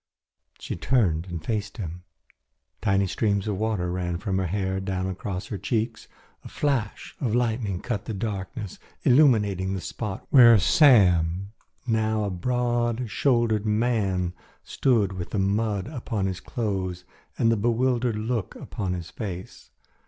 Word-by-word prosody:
She - - -5
turned 95 -10 +1
and 85 -3 -6
faced 105 -3 -3
him. 90 -3 -6 0.8
Tiny 100 -3 +2
streams 100 +1 0
of 100 -3 -2
water 105 -5 -1
ran 90 -1 -2
from 95 +2 -1
her 95 - 0
hair 95 +1 -1
down 95 -1 -2
across 95 0 -4
her 100 - -4
cheeks. 115 +3 -2 0.4
A - - -9
flash 135 -8 -2
of 120 -5 0
lightning 110 -6 0
cut 110 -5 -3
the 115 - -4
darkness, 105 +1 -5 0.2
illuminating 105 - +4
the - - -3
spot 95 +1 -5
where 120 -4 +8
Sam, 95 - +4 0.3
now 110 -2 +1
a 100 - -2
broad 120 +3 -1
shouldered 115 -5 +2
man, 105 -5 +1 0.3
stood 110 -7 +1
with 90 -2 -5
the - - -3
mud 100 0 0
upon 120 -8 -3
his 95 -1 -2
clothes 95 -6 -3 0.3
and 115 -2 +3
the - - +3
bewildered 120 +2 +1
look 110 -2 -2
upon 95 -3 -4
his 85 -1 -6
face. 95 -5 -7
105 Hz, 145 wpm, -25 LUFS, 95-115 Hz, 0.8 s, where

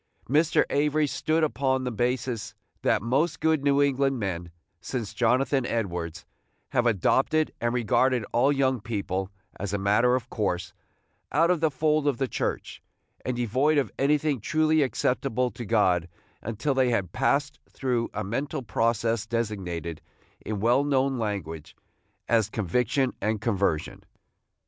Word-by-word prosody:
Mr. 155 +5 +3
Avery 150 +1 +2
stood 155 +3 0
upon 130 -3 +1
the 125 - -2
basis 120 -1 -2 0.3
that - - +2
most 135 +9 +1
good 160 -3 +2
New 140 0 +4
England 135 -1 +1
men, 90 -5 -3 0.3
since 110 0 -4
Jonathan 125 +4 +2
Edwards, 90 -8 -3 0.5
have 120 0 +2
adopted, 135 - +2
and 120 0 +1
regarded 125 0 +2
all 130 +4 +4
young 130 -2 +1
people, 95 -3 -3 0.3
as 100 0 -3
a - - +1
matter 105 +5 +3
of 130 -1 -3
course, 95 -7 -2 0.6
out 165 +4 +3
of 180 - +1
the 160 0 +2
fold 150 +1 +1
of 140 -4 +1
the 135 - 0
Church, - - -3 0.4
and 125 - -2
devoid 130 +6 +2
of 140 - +1
anything 145 -2 +1
truly 155 +4 +2
acceptable 125 -2 0
to 120 - -7
God, 90 -6 +2 0.3
until 115 +6 -2
they 130 -1 +2
had 100 -8 0
passed 140 +5 0
through 125 -3 -1
a 105 - -3
mental 135 +7 -3
process 115 +1 0
designated, 95 -8 -3 0.4
in 105 -2 -3
well 120 +6 +3
known 135 -2 +1
language, 90 -8 -4 0.5
as 115 -2 +2
conviction 125 - 0
and 110 +1 0
conversion. 100 -8 -1
120 Hz, 145 wpm, -26 LUFS, 105-140 Hz, 0.6 s, New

